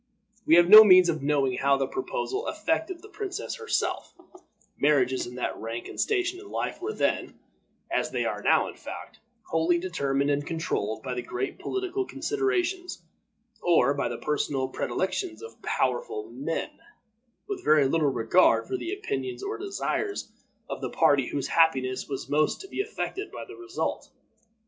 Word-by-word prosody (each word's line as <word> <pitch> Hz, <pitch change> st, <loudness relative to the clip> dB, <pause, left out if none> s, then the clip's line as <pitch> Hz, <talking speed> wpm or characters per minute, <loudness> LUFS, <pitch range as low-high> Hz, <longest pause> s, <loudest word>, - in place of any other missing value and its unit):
We 165 Hz, -, +7 dB
have 175 Hz, 0 st, +6 dB
no 215 Hz, +3 st, +12 dB
means 185 Hz, -3 st, +7 dB
of 155 Hz, -3 st, -1 dB
knowing 140 Hz, -3 st, +1 dB
how 140 Hz, 0 st, +3 dB
the 135 Hz, -, 0 dB
proposal 410 Hz, +1 st, -3 dB
affected 325 Hz, +3 st, -2 dB
the -, -, -10 dB
princess 415 Hz, +2 st, -5 dB
herself; 455 Hz, -1 st, -2 dB, 0.6 s
marriages 130 Hz, -4 st, +2 dB
in 125 Hz, -, -9 dB
that 125 Hz, -, -2 dB
rank 115 Hz, +1 st, -5 dB
and -, -, -9 dB
station 365 Hz, -4 st, 0 dB
in 400 Hz, +1 st, -12 dB
life -, -, -3 dB
were 405 Hz, +4 st, -2 dB
then, -, -, -1 dB, 0.5 s
as -, -, 0 dB
they -, -, -1 dB
are -, -, -2 dB
now -, -, +3 dB
in -, -, -7 dB
fact, -, -, -9 dB, 0.3 s
wholly 165 Hz, +2 st, +3 dB
determined 140 Hz, -6 st, 0 dB
and 145 Hz, 0 st, 0 dB
controlled 145 Hz, -9 st, -3 dB
by 125 Hz, -2 st, -3 dB
great 125 Hz, +2 st, -4 dB
political 385 Hz, 0 st, -2 dB
considerations, 380 Hz, -3 st, -2 dB, 0.6 s
or 160 Hz, -6 st, +4 dB
by 140 Hz, -3 st, -1 dB
the 120 Hz, -, -4 dB
personal 140 Hz, -2 st, -1 dB
predilections 330 Hz, -, -3 dB
of 455 Hz, -, -11 dB
powerful 430 Hz, -4 st, -1 dB
men, -, -, -3 dB, 0.8 s
with 400 Hz, -3 st, -5 dB
very 150 Hz, -3 st, +5 dB
little 150 Hz, +1 st, +2 dB
regard 125 Hz, +9 st, +3 dB
for 390 Hz, -, -2 dB
the 360 Hz, 0 st, -4 dB
opinions 400 Hz, -2 st, -4 dB
or 415 Hz, +2 st, -4 dB
desires 400 Hz, +1 st, -3 dB, 0.4 s
of -, -, -6 dB
the -, -, -3 dB
party 140 Hz, -3 st, +3 dB
whose 140 Hz, -2 st, -3 dB
happiness 135 Hz, -7 st, +2 dB
was 135 Hz, -1 st, -4 dB
most 150 Hz, +2 st, +1 dB
to 390 Hz, -, -9 dB
be 390 Hz, -, -2 dB
affected 400 Hz, -1 st, -4 dB
by -, -, -7 dB
the 395 Hz, -, -11 dB
result. 360 Hz, -1 st, -4 dB
180 Hz, 165 wpm, -27 LUFS, -, 0.8 s, no